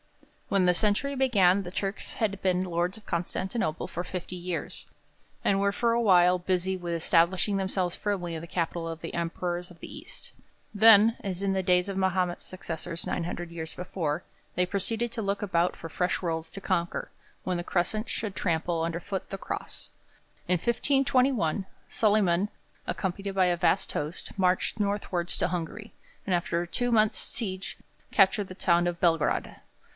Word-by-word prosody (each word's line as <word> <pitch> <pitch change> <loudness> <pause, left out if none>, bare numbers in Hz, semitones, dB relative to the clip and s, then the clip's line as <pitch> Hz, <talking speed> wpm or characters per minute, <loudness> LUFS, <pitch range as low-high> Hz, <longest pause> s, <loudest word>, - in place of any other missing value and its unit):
When 195 -2 +3
the 180 - +5
century 215 +9 +1
began, 200 -8 +4
the 175 - -7
Turks 195 +1 -3
had 200 -3 -1
been 185 0 +2
lords 175 +2 -1
of 215 - -15
Constantinople 175 0 -2
for 175 - -4
fifty 180 0 -5
years, 180 0 -4 0.6
and 195 0 +3
were 200 0 +3
for 230 +3 +1
a 235 - +2
while 180 -4 +5
busy 185 +1 0
with 175 -2 -4
establishing 175 +4 +3
themselves 190 -2 0
firmly 185 -5 -2
in 160 - -5
the 170 - -8
capital 170 -1 -2
of 165 -1 -5
the 165 - -6
Emperors 175 +1 -2
of 170 - -15
the - - -9
East. - - -10 0.4
Then, 220 +1 +7
as 190 -2 -3
in 195 -1 +1
the 190 0 0
days 180 0 +3
of 195 - -3
Mahomet's 185 -2 0
successors 170 -2 -5
nine 175 - -1
hundred 175 0 -5
years 160 -1 -6
before, 175 -3 -2 0.3
they 180 - +3
proceeded 220 +5 -1
to 225 - -3
look 200 -1 -1
about 180 -3 +1
for 165 - -7
fresh 180 +2 -1
worlds 165 -2 -2
to 195 - -6
conquer, 175 -3 -1 0.3
when 185 -1 -1
the 175 - -3
Crescent 200 +6 -1
should 210 -3 -3
trample 165 -1 0
underfoot 170 +4 -3
the 195 - -4
Cross. - - -6 0.6
In 180 - +5
1521, 250 - +2 0.2
Solyman, 205 -3 +2 0.4
accompanied 195 +1 -3
by 190 -1 +4
a 175 -1 +3
vast 170 - +1
host, 150 +3 -4
marched 185 +3 +1
northwards 200 -4 -1
to - - +1
Hungary, 180 +5 -4 0.3
and 190 - 0
after 175 -1 +1
a 175 - -4
two 245 +8 -1
months' 215 -2 +4
siege 190 -4 -3 0.3
captured 195 0 +4
the 185 - -8
town 175 -2 +3
of 175 -1 -2
Belgrade. 165 -3 +1
185 Hz, 170 wpm, -28 LUFS, 175-200 Hz, 0.6 s, Then